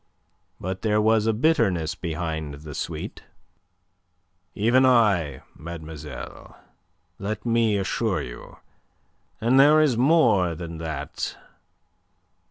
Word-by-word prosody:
But 95 +1 -4
there 105 -1 +2
was 110 0 +3
a - - +4
bitterness 110 - +1
behind 80 -3 -4
the 75 - -7
sweet. - - -5 1.3
"Even 120 +5 +3
I, 100 - +3
mademoiselle, 80 -2 -9 0.6
let 105 +2 -4
me 115 -3 +2
assure 95 -2 -1
you. - - -10 0.8
And 120 +4 +3
there 150 +3 +7
is 145 -7 +3
more 120 - +3
than 85 -1 -7
that. 80 -3 -5
100 Hz, 100 wpm, -24 LUFS, 80-115 Hz, 1.3 s, there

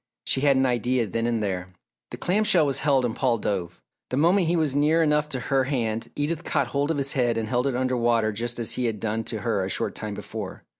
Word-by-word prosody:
She 130 - +1
had 140 -2 +4
an 130 - +3
idea 125 0 +1
then 115 +3 -2
and 115 -2 0
there. 95 -2 -4 0.3
The - - -7
clam 200 +5 +1
shell 175 -7 +4
was 140 -1 0
held 135 -3 +2
and 115 - -2
Paul 125 -3 +1
dove. 90 -5 -3 0.3
The 130 - -2
moment 175 +4 +3
he 170 - +2
was 155 -5 +1
near 155 +3 +3
enough 150 -1 +1
to 135 -3 -2
her 135 +1 +1
hand, 115 -5 -2
Edith 155 +3 -2
caught - - 0
hold 140 +1 0
of 160 - 0
his 140 0 +1
head 120 -3 +1
and 110 -1 -2
held 125 +3 0
it 135 - -1
under 130 0 0
water 115 -2 +2
just 120 +3 -3
as 115 -2 -1
he 125 - -1
had 110 -2 -3
done 110 +1 -2
to 110 -3 -4
her 110 -5 0
a 95 - -3
short - - -2
time 105 -2 -5
before. 105 -1 -7
125 Hz, 255 wpm, -25 LUFS, 110-145 Hz, 0.3 s, had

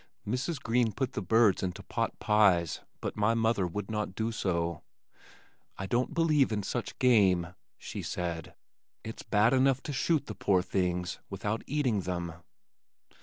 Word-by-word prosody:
Mrs. 130 +7 -2
Green 115 -2 +1
put 130 -1 -2
the - - -2
birds 110 -3 +4
into 90 -2 -4
potpies 95 -6 +2 0.2
but - - -3
my 105 +2 +2
mother 110 -4 +2
would 105 +4 -5
not 105 -3 -2
do 110 +1 -1
so. 85 -6 -1 1.0
"I 95 - -4
don't 120 - 0
believe 155 -6 +3
in 105 -2 -1
such 120 +4 -4
game," 95 -9 +3 0.2
she - - -6
said. 85 -2 -4 0.5
"It's 110 - -7
bad 110 +4 +3
enough 135 0 +3
to 145 - -4
shoot 150 +2 +1
the 105 - -6
poor 95 -2 +2
things 90 -2 -1
without 105 +3 -2
eating 130 -7 +1
them." 85 -1 -3
105 Hz, 150 wpm, -30 LUFS, 90-125 Hz, 1.0 s, birds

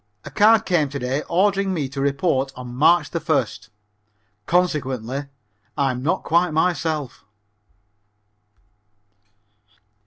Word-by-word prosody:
A - - -8
card 220 +1 +4
came 160 -6 +1
to 140 - -5
day 130 +2 -2
ordering 195 +1 +1
me 150 -5 -2
to 135 0 -5
report 140 -1 0
on 125 -1 -8
March 155 +4 +3
1st. 145 - -2 0.8
Consequently 140 -7 -1 0.5
I 140 -2 +2
am 125 0 -5
not 165 +8 -1
quite 170 +2 +2
myself. 160 -3 -1
150 Hz, 105 wpm, -22 LUFS, 135-175 Hz, 0.8 s, card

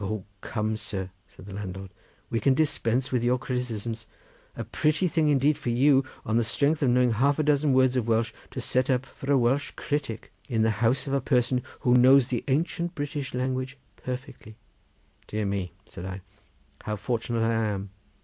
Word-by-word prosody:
"O 105 -1 -3 0.2
come, 110 -1 -2
sir!" 95 -4 -5 0.2
said 95 - -15
the 100 - -9
landlord, 95 -1 -6 0.4
"we 115 - +1
can 135 +1 +3
dispense 130 -5 +1
with 125 -2 +1
your 125 +1 +3
criticisms. 120 -3 -4 0.5
A - - -3
pretty 155 +4 +1
thing 160 -2 +2
indeed 145 +1 +3
for - - -3
you, 135 +3 +4 0.2
on 110 +1 +1
the 120 - +3
strength 145 +7 +1
of 135 - +3
knowing 125 0 +4
half 135 +6 +2
a 155 - +1
dozen 150 -1 +3
words 130 -1 +4
of 120 -3 0
Welsh, 115 0 +1 0.2
to - - -6
set 130 0 0
up 130 0 +2
for 135 +1 -5
a 140 - +5
Welsh 130 +3 +2
critic 145 -6 -3 0.2
in 115 -3 +2
the 110 - +3
house 120 +3 +2
of 140 - -3
a 140 - +2
person 125 -1 +2 0.2
who 125 - +3
knows 130 +1 +6
the 120 -3 -1
ancient 170 +5 0
British 145 -2 -4
language 130 +1 -2 0.2
perfectly." 125 -4 -7 0.7
"Dear 105 0 -2
me!" 100 -2 -2
said 85 - -9
I, 95 0 -6 0.6
"how 105 - -2
fortunate 115 +2 -1
I 115 - +2
am! 105 -3 -1
125 Hz, 190 wpm, -27 LUFS, 110-135 Hz, 0.7 s, knows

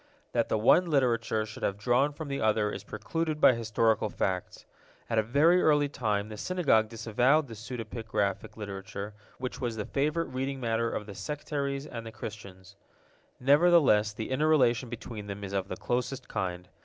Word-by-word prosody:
That 115 -2 0
the - - +2
one 170 +11 +4
literature 115 -6 +1
should 105 - -10
have 100 - -1
drawn 125 +6 +2
from 150 +1 -7
the 140 0 -3
other 110 -1 +2
is 100 - -6
precluded 155 +10 -3
by 130 - +7
historical 110 -1 +1
facts. 95 -2 -3 0.5
At 115 - +3
a - - +5
very 150 +11 +4
early 145 -2 +3
time 105 -6 -1
the 110 - -7
Synagogue 125 - +2
disavowed 120 +6 +2
the 115 - -9
pseudepigraphic 110 -3 -3
literature, 100 0 -6 0.2
which 125 0 -5
was 120 -3 -2
the 105 -2 -3
favorite 155 +4 0
reading 135 +1 -3
matter 115 -1 0
of 105 - -4
the 100 - -8
sectaries 140 +1 -3
and 120 -6 -7
the 115 - -8
Christians. 100 -4 -9 0.6
Nevertheless 140 -6 +5
the 110 +4 -6
inner 150 +4 +2
relation 125 -5 +3
between 115 -3 -7
them 100 0 -6
is 100 0 -6
of 95 -1 -1
the - - -5
closest 125 +2 -2
kind. 90 -1 -3
115 Hz, 175 wpm, -29 LUFS, 105-140 Hz, 0.6 s, by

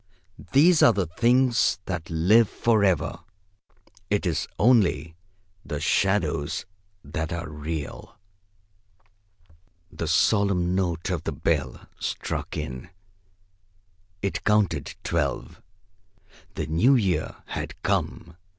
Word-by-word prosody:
These 160 +5 +5
are 120 - +7
the 95 -3 0
things 120 +8 +2
that 85 -3 -4
live 95 +7 +4
for 110 -3 +2
ever. 90 -3 +1 0.9
It 105 -1 0
is 85 -4 -1
only 100 -8 +3 0.5
the 75 -3 -4
shadows 80 -6 0 0.4
that 80 +3 -4
are 85 -1 -4
real!" 75 0 -6 1.7
The 85 - -4
solemn 90 +2 +2
note 90 -2 -1
of 85 -4 -1
the - - -2
bell - - -2
struck - - -4
in. 65 0 -6 1.3
It 100 - -2
counted 100 -9 +1
twelve. - - -2 0.9
The - - -2
new 105 - +3
year 100 -7 0
had - - -6
come. 85 0 -2
90 Hz, 105 wpm, -25 LUFS, 80-105 Hz, 1.7 s, are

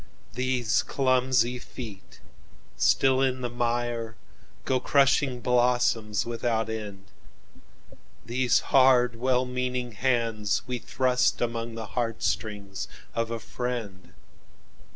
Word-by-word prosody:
"These 125 -3 +1
clumsy 130 -2 +1
feet, 110 -6 -10 0.5
still 130 - +3
in 130 -1 +1
the 120 -1 -3
mire, 120 -1 -2 0.5
Go 130 -1 +1
crushing 135 -1 +2
blossoms 120 -4 +2
without 115 -1 -1
end; 105 -3 -6 1.2
These 120 +1 +2
hard, 125 -2 +5
well 125 +1 +1
meaning 125 -1 -2
hands 115 -2 0
we 125 -1 -3
thrustAmong 120 -2 0
the 115 -1 -5
heart 115 0 -2
strings 100 -2 -3 0.3
of 115 0 -1
a 115 - -2
friend. 115 -7 -5
120 Hz, 100 wpm, -27 LUFS, 115-125 Hz, 1.2 s, hard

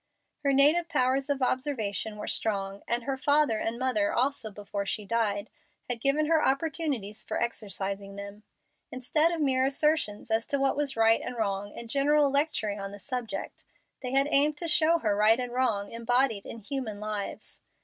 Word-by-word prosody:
Her 280 - +3
native 300 +5 +5
powers 265 -2 +1
of 280 -2 0
observation 225 -6 -1
were 210 - -6
strong, 195 -2 0
and 235 0 +1
her 270 +2 -2
father, 285 -5 +2
and 225 +1 -2
mother 260 +5 0
also 255 -3 0
before 205 0 -5
she 205 +1 -3
died, 210 -2 -1 0.4
had 240 -2 -3
given 285 +4 +2
her 320 0 +2
opportunities 275 - -1
for - - -3
exercising 200 -3 -4
them. 200 +1 -8 0.5
Instead 290 +6 +2
of 335 -2 -2
mere 260 -3 +2
assertions 270 -6 +1
as 225 +1 +1
to 280 - 0
what 275 0 +2
was 280 -3 -2
right 225 0 +4
and 250 -1 -6
wrong 205 -2 -3
and 235 - -7
general 285 +3 +3
lecturing 275 -8 0
on 195 0 -5
the 205 - -9
subject, 245 +2 -5 0.4
they 250 -1 -4
had 275 +1 +3
aimed 295 +2 +5
to 335 - -3
show 320 +1 +4
her 215 -10 0
right 215 +3 +4
and 250 -1 -3
wrong 220 -6 0
embodied 235 -2 0
in - - -7
human 225 -2 -5
lives. 210 -1 -5
250 Hz, 180 wpm, -28 LUFS, 210-280 Hz, 0.5 s, native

